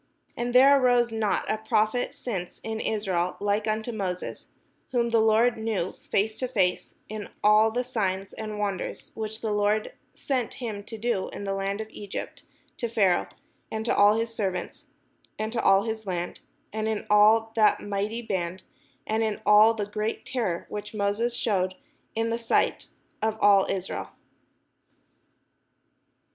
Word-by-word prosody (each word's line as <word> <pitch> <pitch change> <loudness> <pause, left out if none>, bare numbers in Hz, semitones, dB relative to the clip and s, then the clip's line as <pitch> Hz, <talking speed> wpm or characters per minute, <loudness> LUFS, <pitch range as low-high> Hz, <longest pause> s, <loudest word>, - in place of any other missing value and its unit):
And 240 +1 -3
there 275 +2 +8
arose 245 -2 +3
not 220 -2 0
a 215 - -1
prophet 220 +2 0
since 190 -8 -5
in 220 0 -3
Israel 185 -6 -1
like 205 +1 0
unto 220 +2 -1
Moses, 190 -5 -4 0.4
whom 235 -2 +1
the 230 -1 +4
Lord 225 +2 +4
knew 215 -5 -1
face 215 +2 -2
to 255 - -1
face, 190 -8 0
in 215 -1 -6
all 210 +1 +6
the 245 +3 -1
signs 195 -6 -2
and 215 -1 -5
the - - -6
wonders, 200 -3 -3
which 220 0 -5
the 220 - -1
Lord 210 +1 +1 0.2
sent 255 -5 -2
him 220 -5 -5
to 225 - -7
do 220 -4 -1
in - - -7
the 195 -1 -2
land 195 +2 -2
of 220 - -7
Egypt 205 -2 -6 0.4
to 235 - -2
Pharaoh, 195 -5 +2 0.4
and 220 0 -3
to - - +2
all 205 +1 +6
his 230 0 -2
servants, 190 -5 -3 0.5
and 220 +1 -3
to 230 - 0
all 195 +1 +5
his 220 -2 -4
land, 175 -1 -3 0.3
and 220 0 -1
in 220 -1 -2
all 215 +2 +5
that 215 -2 +4
mighty 205 +3 -3
band, 185 -3 -3 0.4
and 220 +1 0
in 220 -2 -1
all 215 +2 +7
the 210 -2 -2
great 210 +2 -3
terror 210 -10 -2
which 210 +1 -6
Moses 210 +4 0
shewed 185 -6 0 0.4
in 225 +1 0
the 230 - -1
sight 230 - +1 0.3
of 220 0 0
all 200 -1 +5
Israel. 190 -1 -3
215 Hz, 160 wpm, -26 LUFS, 200-225 Hz, 0.5 s, there